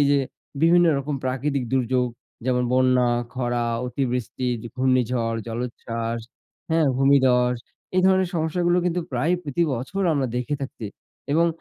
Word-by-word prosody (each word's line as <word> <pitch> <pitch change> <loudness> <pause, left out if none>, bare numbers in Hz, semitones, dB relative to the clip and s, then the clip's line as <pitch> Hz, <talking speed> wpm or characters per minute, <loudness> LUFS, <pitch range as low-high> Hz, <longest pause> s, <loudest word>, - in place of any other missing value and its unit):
এই 145 - +4
যে 140 - +4 0.4
বিভিন্ন 175 +1 +6
রকম 140 +1 -3
প্রাকৃতিক 135 +1 -1
দুর্যোগ 125 -1 +1 0.4
যেমন, 125 -1 +1
বন্যা, 125 -1 +4 0.3
খরা, 120 -1 -1 0.2
অতিবৃষ্টি, 125 0 -2 0.2
ঝ - - -11
ঘূর্ণিঝড়, 125 -3 +1
জলোচ্ছ্বাস 115 -1 -4 0.5
হ্যাঁ, 160 -1 +3
ভূমিধস, 130 -3 +4 0.4
এই 185 - +4
ধরনের 190 -1 +3
সমস্যাগুলো 175 +2 +1
কিন্তু 180 0 0
প্রায় 130 +8 +1
প্রতি 150 +4 -1
বছর 135 +12 -3
আমরা 140 -3 +1
দেখে 125 +4 -1
থাকছি। 130 -4 -6 0.5
এবং 165 +3 +4
130 Hz, 135 wpm, -24 LUFS, 125-150 Hz, 0.5 s, বিভিন্ন